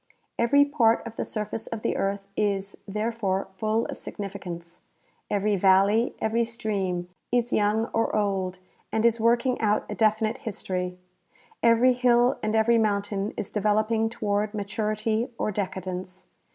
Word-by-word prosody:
Every 285 Hz, +5 st, +5 dB
part 240 Hz, -7 st, +2 dB
of 230 Hz, -1 st, -7 dB
the -, -, -2 dB
surface 215 Hz, 0 st, -4 dB
of 225 Hz, -2 st, -5 dB
the -, -, 0 dB
earth 195 Hz, 0 st, -2 dB
is, 200 Hz, -1 st, -1 dB
therefore, 210 Hz, -2 st, -1 dB
full 215 Hz, +3 st, 0 dB
of -, -, -6 dB
signifi 200 Hz, -1 st, -7 dB
cance. 170 Hz, -1 st, -8 dB, 0.5 s
Every 205 Hz, 0 st, +1 dB
valle}^ 195 Hz, +5 st, +4 dB
every 225 Hz, +2 st, +1 dB
stream, 200 Hz, -6 st, -2 dB, 0.2 s
is 245 Hz, 0 st, +1 dB
young 215 Hz, +2 st, +2 dB
or 225 Hz, -, +1 dB
old, 195 Hz, -3 st, 0 dB, 0.3 s
and 220 Hz, +1 st, +1 dB
is 235 Hz, 0 st, +3 dB
working 240 Hz, +3 st, +2 dB
out 210 Hz, -1 st, +2 dB
a -, -, -3 dB
definite 220 Hz, 0 st, +1 dB
histor3^ 180 Hz, -4 st, -3 dB, 0.7 s
Every 235 Hz, +2 st, +5 dB
hill 245 Hz, 0 st, +3 dB
and 215 Hz, +1 st, -1 dB
every 230 Hz, +1 st, +4 dB
mountain 205 Hz, -1 st, -1 dB
is 210 Hz, -, -4 dB
developing 215 Hz, +2 st, +1 dB
toward 210 Hz, -1 st, -1 dB
maturity 215 Hz, +2 st, -1 dB
or -, -, -1 dB
decadence. 185 Hz, -2 st, -5 dB
215 Hz, 145 wpm, -26 LUFS, 195-230 Hz, 0.7 s, Every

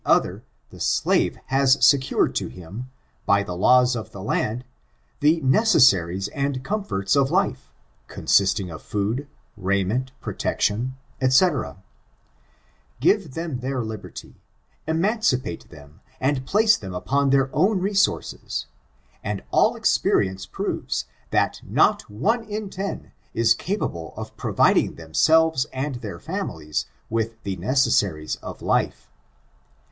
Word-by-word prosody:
416* -, -, +5 dB
Other, -, -, -12 dB, 0.3 s
the -, -, -13 dB
slave -, -, +1 dB
has 135 Hz, 0 st, +4 dB
secured 135 Hz, -2 st, +3 dB
to -, -, -2 dB
him, 95 Hz, +9 st, -9 dB, 0.4 s
by 100 Hz, 0 st, +4 dB
the 90 Hz, -3 st, -5 dB
laws 125 Hz, +6 st, +4 dB
of 110 Hz, -, -5 dB
the 95 Hz, -, -9 dB
land, 115 Hz, +3 st, -1 dB, 0.5 s
the 155 Hz, +3 st, +3 dB
necessaries 125 Hz, -, +4 dB
and 140 Hz, -2 st, -2 dB
comforts 195 Hz, -, -1 dB
of 135 Hz, -1 st, +3 dB
life, 140 Hz, -7 st, 0 dB, 0.4 s
con -, -, -9 dB
sisting 95 Hz, -2 st, +3 dB
of 80 Hz, -, -9 dB
food, 110 Hz, +8 st, -2 dB, 0.3 s
raiment, 100 Hz, +6 st, -1 dB
protection, 120 Hz, +5 st, -1 dB, 0.3 s
dGc 130 Hz, -, +3 dB, 1.2 s
(Give 200 Hz, -8 st, +2 dB
them 165 Hz, -6 st, -3 dB
their 130 Hz, -1 st, -2 dB
liberty, 110 Hz, -2 st, -9 dB, 0.5 s
emancipate 160 Hz, -, 0 dB
them 75 Hz, +1 st, -15 dB, 0.2 s
and 130 Hz, -1 st, 0 dB
place 215 Hz, +5 st, +4 dB
them 95 Hz, -3 st, -8 dB
upon 140 Hz, +9 st, +1 dB
their 135 Hz, 0 st, +2 dB
own 190 Hz, +5 st, +3 dB
resources, 195 Hz, +1 st, -1 dB, 0.6 s
and 105 Hz, -1 st, -3 dB
all -, -, +3 dB
experience 95 Hz, 0 st, +1 dB
proves -, -, -3 dB, 0.2 s
that -, -, 0 dB
not -, -, +2 dB
one 215 Hz, -, 0 dB
in 210 Hz, -2 st, -5 dB
ten 195 Hz, +2 st, -5 dB, 0.2 s
is 115 Hz, 0 st, +4 dB
capable 115 Hz, -, -4 dB
of -, -, -7 dB
providing -, -, +2 dB
themselves 150 Hz, -, +3 dB
and 135 Hz, 0 st, -3 dB
their 100 Hz, -6 st, -6 dB
families 75 Hz, -2 st, -4 dB, 0.2 s
with 115 Hz, 0 st, -2 dB
the 100 Hz, -1 st, -3 dB
necessaries 105 Hz, -, +1 dB
of -, -, -9 dB
life.) -, -, 0 dB
130 Hz, 125 wpm, -23 LUFS, 100-150 Hz, 1.2 s, 416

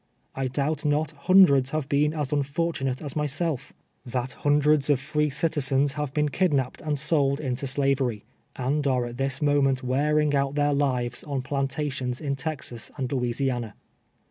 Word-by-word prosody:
I 135 Hz, 0 st, -2 dB
doubt 145 Hz, +3 st, -1 dB
not 150 Hz, +1 st, +1 dB
hundreds 145 Hz, -4 st, +5 dB
have 155 Hz, -1 st, -2 dB
been 145 Hz, +1 st, +2 dB
as 150 Hz, -4 st, -2 dB
unfortunate 140 Hz, -2 st, -1 dB
as 145 Hz, -3 st, -6 dB
myself; 150 Hz, -1 st, -2 dB, 0.3 s
that 125 Hz, +1 st, -3 dB
hundreds 145 Hz, 0 st, +2 dB
of 145 Hz, -3 st, +4 dB
free 150 Hz, +2 st, 0 dB
citizens 140 Hz, -2 st, +1 dB
have 150 Hz, -2 st, -3 dB
been 150 Hz, +1 st, +1 dB
kid 180 Hz, 0 st, +1 dB
napped 130 Hz, -2 st, -2 dB
and 150 Hz, -1 st, -1 dB
sold 140 Hz, -2 st, +2 dB
into 135 Hz, -1 st, -2 dB
slavery, 135 Hz, -5 st, +1 dB, 0.3 s
and 140 Hz, +3 st, -1 dB
are 125 Hz, -2 st, +1 dB
at 120 Hz, 0 st, -7 dB
this 135 Hz, +3 st, -1 dB
mo 145 Hz, -1 st, +3 dB
ment 135 Hz, -1 st, +1 dB
wearing 150 Hz, +3 st, +1 dB
out 140 Hz, 0 st, 0 dB
their 145 Hz, 0 st, +2 dB
lives 125 Hz, -4 st, 0 dB
on 140 Hz, -3 st, -3 dB
plantations 135 Hz, -2 st, -2 dB
in 140 Hz, -3 st, -2 dB
Texas 135 Hz, -5 st, -5 dB
and 130 Hz, -3 st, -3 dB
Louisiana. 125 Hz, -3 st, -1 dB
140 Hz, 165 wpm, -26 LUFS, 130-150 Hz, 0.3 s, hundreds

